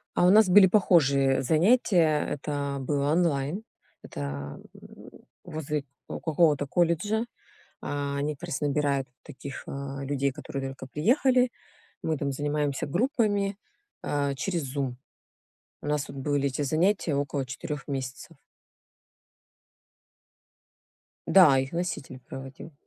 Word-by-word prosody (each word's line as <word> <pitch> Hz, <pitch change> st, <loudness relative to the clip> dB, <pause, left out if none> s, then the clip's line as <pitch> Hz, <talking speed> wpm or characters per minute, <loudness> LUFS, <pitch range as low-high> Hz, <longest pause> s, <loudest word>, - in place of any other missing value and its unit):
А 175 Hz, -, +4 dB
у 180 Hz, -, +6 dB
нас 215 Hz, -1 st, +6 dB
были 190 Hz, +1 st, +8 dB
похожие 140 Hz, -9 st, +3 dB
занятия. 165 Hz, -, +3 dB
Это 140 Hz, -1 st, -3 dB
было 140 Hz, +2 st, 0 dB
онлайн, 165 Hz, +2 st, +1 dB, 0.4 s
это, 70 Hz, 0 st, -6 dB, 0.2 s
м, -, -, -14 dB, 0.3 s
возле 150 Hz, -3 st, -3 dB, 0.2 s
какого-то 155 Hz, -3 st, +1 dB
колледжа. 175 Hz, -, +1 dB, 0.6 s
А, 140 Hz, -1 st, -3 dB
они 145 Hz, +1 st, -1 dB
как -, -, -22 dB
раз 130 Hz, -, -3 dB
набирают 140 Hz, -2 st, 0 dB, 0.2 s
таких, 140 Hz, -1 st, -8 dB
а, 140 Hz, 0 st, -5 dB
людей, 140 Hz, 0 st, 0 dB
которые 135 Hz, +1 st, -5 dB
только 130 Hz, 0 st, -9 dB
приехали. 250 Hz, -, +3 dB, 0.5 s
Мы 160 Hz, -2 st, 0 dB
там 140 Hz, 0 st, -2 dB
занимаемся 145 Hz, 0 st, -1 dB
группами, 205 Hz, -, 0 dB, 0.5 s
а, 140 Hz, -1 st, 0 dB
через 170 Hz, +3 st, -2 dB
"Зум". 135 Hz, -2 st, -3 dB, 0.8 s
У -, -, -7 dB
нас 150 Hz, 0 st, 0 dB
тут 140 Hz, -, -10 dB
были 140 Hz, 0 st, 0 dB
эти 135 Hz, +2 st, -3 dB
занятия 165 Hz, +2 st, +1 dB
около 140 Hz, -1 st, -1 dB
4 135 Hz, +3 st, -6 dB
месяцев. 135 Hz, +3 st, -5 dB, 2.9 s
Да, 155 Hz, -9 st, +7 dB
их 130 Hz, +1 st, -2 dB
носитель 160 Hz, -7 st, -4 dB
проводил. 135 Hz, +5 st, -9 dB
145 Hz, 120 wpm, -27 LUFS, 135-170 Hz, 2.9 s, были